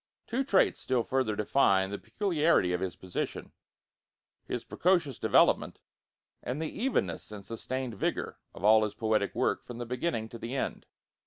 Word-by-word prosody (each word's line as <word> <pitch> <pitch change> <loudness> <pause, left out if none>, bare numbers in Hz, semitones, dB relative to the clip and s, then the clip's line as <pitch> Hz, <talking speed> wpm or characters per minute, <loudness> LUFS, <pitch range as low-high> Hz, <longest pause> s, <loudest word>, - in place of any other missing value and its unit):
Two 250 +3 -1
traits 205 -8 +3
still 125 -2 0
further 130 -5 0
define 100 -3 +3
the 100 - -4
peculiarity 165 - +1
of 90 - -1
his 95 -2 -3
position 95 -1 -5 0.9
his - - -4
precocious 170 -8 +1
development, - - +3 0.6
and 130 +4 -4
the 160 -1 -3
evenness 210 - -1
and 100 -2 -8
sustained 125 +2 -4
vigor - - -2 0.2
of - - -10
all 110 +1 +6
his 105 - -2
poetic 110 -1 0
work - - 0
from 120 - -8
the 120 - -4
beginning 125 -1 -2
to 115 - -9
the 120 +4 -5
end. 135 - -3
120 Hz, 160 wpm, -30 LUFS, 105-150 Hz, 0.9 s, all